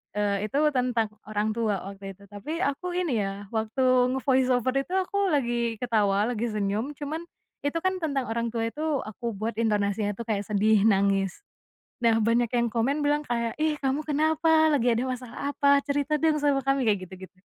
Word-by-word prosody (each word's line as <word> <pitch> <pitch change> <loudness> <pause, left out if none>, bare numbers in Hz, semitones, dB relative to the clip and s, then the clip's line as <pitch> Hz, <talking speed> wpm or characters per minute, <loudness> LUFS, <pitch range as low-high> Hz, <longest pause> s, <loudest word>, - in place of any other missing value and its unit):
Eee, 205 0 0
itu 275 - -3
tentang 245 -4 0 0.2
orang 215 0 -1
tua 215 -4 -1
waktu 195 0 -8
itu 200 - -19
tapi 305 - -4
aku 350 +6 -2
ini 300 -12 0
ya 195 +1 -4
waktu 250 +3 +2
nge-voice 260 -1 +2
over 255 +1 0
itu - - -12
aku 400 +1 0
lagi 240 -6 0
ketawa 210 -4 +1
lagi 230 +1 -2
senyum 215 +7 -2
cuman 310 +3 -4 0.4
itu 285 +3 -1
kan 375 +2 -1
tentang 280 -5 -1
orang 230 0 -2
tua 225 0 -2
itu 300 - -7 0.2
aku 220 +1 -5
buat 220 +3 -2
intonasinya 205 -2 0
tuh 235 - -6
kayak 205 -3 -2
sedih, 210 0 +3
nangis, 195 - +1 0.6
nah 230 -1 +4
banyak 230 +2 +2
yang 235 -2 +1
komen 275 +6 0
bilang 295 +1 +2
kayak, 235 -1 -1
"Ih 310 -1 +1
kamu 270 +1 0
kenapa? 315 +1 +3
Lagi 245 -4 +2
ada 245 - 0
masalah 255 +3 -5
apa? 280 -1 +4
Cerita 285 +1 0
dong 310 0 +1
sama 280 -2 +1
kami." 275 -3 +1
Kayak 200 -3 +1
gitu-gitu. 190 +1 -12
235 Hz, 180 wpm, -26 LUFS, 210-285 Hz, 0.6 s, nah